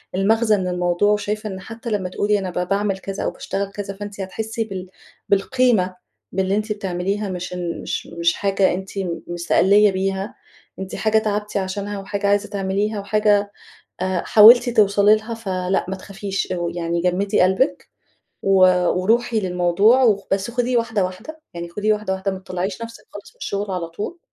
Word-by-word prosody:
المغزى 215 +3 +3
من 185 -2 -2
الموضوع 180 +3 +1
وشايفة 210 +1 -1
إن 190 -1 -6
حتى 225 +4 -8
لمّا 200 -4 -1
تقولي 205 +3 +1
أنا 190 -1 -4
ب 180 0 -3
باعمل 200 0 0
كذا 195 0 -5
أو - - -1
باشتغل 200 0 -4
كذا 200 -1 -5
فأنتِ 205 0 -7
هتحسي 220 +4 -3
بال 190 -4 -7 0.4
بالقيمة 200 -2 +2 0.4
باللي 190 +1 0
أنتِ 215 +1 -2
بتعمليها 195 +1 -3
مش 180 0 -5
إن 175 -2 -4
مش - - -4
مش 170 0 0
حاجة 195 -2 +1
أنتِ 190 +2 -6
م 180 -3 -3
مستقلّية 190 +4 +3
بيها، 190 +1 -2 0.4
أنتِ 190 0 -5
حاجة 220 0 +2
تعبتِ 210 -1 -1
عشانها 200 +1 -3
وحاجة 200 +1 -3
عايزة 205 0 +1
تعمليها 200 +1 -1
وحاجة 205 0 +2 0.5
آآ، 185 -1 -1
حاولتِ 235 +3 +8
توصلي 205 -1 +4
لها، 220 +2 -6
فلأ 190 -4 -1
ما 190 - -3
تخافيش 195 0 -4
أو 175 -1 -2
يعني 170 0 -2
جمدي 180 +3 +1
قلبِك، 190 +9 +2 0.6
و 195 - +2 0.4
وروحي 225 +5 +1
للموضوع 185 +6 +3
و 205 -5 +2
بس 195 +4 0
خُديه 245 +1 0
واحدة 225 -4 0
واحدة، 185 +13 -7
يعني 170 0 -6
خُديه 210 +4 +1
واحدة 210 -2 -2
واحدة، 190 +1 -2
ما 190 - -6
تطلّعيش 185 +2 -4
نفسِك 230 0 -9
خالص 205 - -10
من - - -33
الشغل 200 0 -3
على 180 -3 -3
طول 210 - -6
200 Hz, 175 wpm, -21 LUFS, 185-210 Hz, 0.6 s, حاولتِ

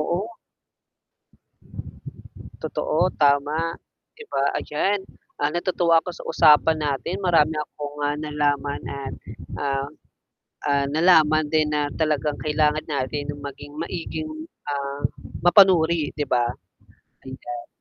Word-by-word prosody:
Oo. 170 +3 0 2.4
Totoo, 160 - -1 0.2
tama, 145 +2 +3 0.5
'di 460 - -11
ba? 135 - +1 0.2
Ayan, 195 +7 0 0.4
ah, 145 - +2
natutuwa 175 -1 +2
ako 180 - -5
sa - - -10
usapan 160 0 +5
natin, 145 +7 -2
marami 160 -3 +4
akong, 145 -1 -6
ah, 145 - -1
nalaman 145 -1 0 0.2
at, 135 - -5 0.5
ah 135 -1 -1 0.8
ah, 140 -1 +2
nalaman 155 -2 +5
din 155 -1 +3
na 150 - +1 0.2
talagang 150 -1 +1
kailangan 150 0 +2
natin 145 +1 -2
yung 145 0 -10
maging 145 +1 -11
maiging, 160 -2 -5 0.4
ah, 140 0 -3 0.4
mapanuri 175 -3 +6
'di 145 -2 -2
ba? 120 - +4 0.8
Ayan. 120 -2 -7
150 Hz, 110 wpm, -23 LUFS, 145-160 Hz, 2.4 s, mapanuri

